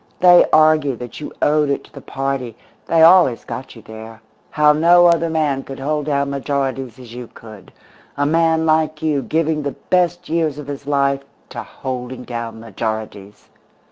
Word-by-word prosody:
They 175 -1 +6
argued 155 -4 +3
that 120 0 -9
you 150 - -7
owed 150 -1 +2
it 140 - -2
to - - -21
the - - -10
party 135 -4 -4 0.3
they 165 -1 +3
always 170 -8 +5
got 130 0 -8
you 115 - -14
there; 110 0 -11 0.3
how 150 0 +3
no 170 +3 +5
other 170 -1 +3
man 150 -4 0
could 135 0 -9
hold 150 +2 -3
down 140 -1 0
majorities 135 -3 -3
as 125 -3 -12
you 120 -1 -8
could 110 -4 -13 0.5
a 145 - +1
man 160 +1 +2
like 155 -1 0
you 150 -3 0
giving 160 +1 -1
the 140 -1 -4 0.2
best 175 -1 +1
years 160 -3 -1
of 150 - -8
his 140 0 -8
life 140 -1 +1 0.3
to - - -6
holding 125 -1 -7
down 115 -2 -6
majorities! 110 -2 -6
140 Hz, 175 wpm, -19 LUFS, 125-155 Hz, 0.5 s, They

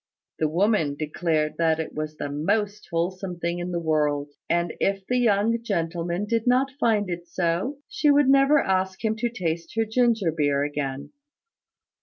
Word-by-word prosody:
The 155 - +1
woman 170 -4 +1
declared 155 0 -1
that 160 -1 +2
it 160 - -4
was 155 0 -5
the - - -3
most 205 +8 -1
wholesome 180 +2 -2
thing 170 +1 -2
in 175 +1 -4
the 175 - -2
world; 150 -3 0 0.2
and 170 -1 +1
if 195 -1 0
the 250 +3 +1
young 225 0 +2
gentleman 175 -2 -2
did 230 +2 -1
not 260 +2 +3
find 215 -6 +2
it 175 -1 -5
so, 175 +10 -1
she 345 -3 +1
would 290 -1 +5
never 275 +2 +5
ask 190 -1 -1
him 220 0 +1
to 240 +2 0
taste 170 -7 -4
her 225 0 +2
ginger 225 -5 +2
beer 145 -3 +1
again. 140 -2 -4
180 Hz, 170 wpm, -25 LUFS, 160-220 Hz, 0.2 s, would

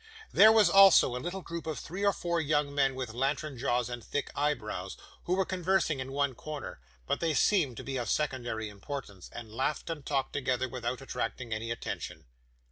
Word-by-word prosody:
There 215 +2 +8
was, 220 -3 +6
also, 190 -8 +7
a 125 - -3
little 180 +2 -4
group 170 0 -6
of 155 - -2
three 185 +5 -5
or 200 - +5
four 170 -3 -1
young 145 -1 +1
men 135 -2 +2
with 130 -4 -4
lantern 140 +3 -1
jaws 120 -1 0
and 120 -1 -6
thick 145 - -3
eyebrows, 110 -10 -2 0.3
who 180 - +1
were 190 0 +1
conversing 180 -5 +1
in 130 +1 -5
one 140 -1 0
corner; 145 +4 -7 0.3
but - - -1
they 165 -3 0
seemed 150 - +2
to - - -6
be 135 -1 -3
of 120 -4 -3
secondary 120 -6 -1
importance, 105 -2 -8
and 115 -2 -9
laughed 135 +7 -1
and 155 -3 -5
talked 135 -2 -1
together 130 -2 0
without 125 0 -4
attracting 125 -3 -4
any 110 +1 -4
attention. 115 - -5
140 Hz, 195 wpm, -30 LUFS, 120-165 Hz, 0.3 s, There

